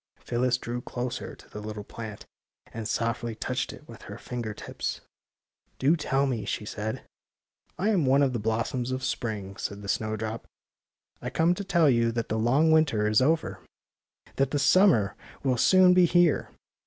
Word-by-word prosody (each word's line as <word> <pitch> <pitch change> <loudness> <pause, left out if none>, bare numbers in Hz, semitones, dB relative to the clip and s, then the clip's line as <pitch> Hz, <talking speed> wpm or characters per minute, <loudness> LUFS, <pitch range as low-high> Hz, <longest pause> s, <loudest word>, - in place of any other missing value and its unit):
Phyllis 125 +1 0
drew 120 -1 -5
closer 125 0 -5
to - - -18
the 105 - -8
little 105 0 -6
plant 110 0 -8 0.5
and 115 -2 -4
softly 115 +1 -2
touched - - -2
it - - -13
with - - -12
her - - -9
finger 120 -3 -5
tips. - - -5 0.4
'* - - -46
Do 145 +5 +3
tell 140 -3 0
me," 120 -6 -2
she 105 - -3
said. 110 +1 -3
*^ - - -12 0.8
I 200 +4 +1
am 180 -10 +2
one 135 +2 +5
of 135 -2 +1
the 120 - -1
blossoms 115 +3 -1
of 130 0 -3
spring," 105 -7 -3
said 100 0 -5
the - - -7
snowdrop. 110 +2 -2
^^ - - -27 0.7
I - - -3
come 165 +2 +2
to 200 - -5
tell 175 -5 +3
you 115 -3 +3
that 115 -1 -3
the 110 - 0
long 135 +8 +3
winter 135 -10 +3
is 110 +3 +3
over; 160 +4 +1 0.8
that 135 -1 +2
the 145 - -1
summer 140 - +4 0.3
will 130 -3 +1
soon 185 +7 +6
be 180 -1 +6
here. 175 -3 +3
120 Hz, 185 wpm, -27 LUFS, 110-145 Hz, 0.8 s, soon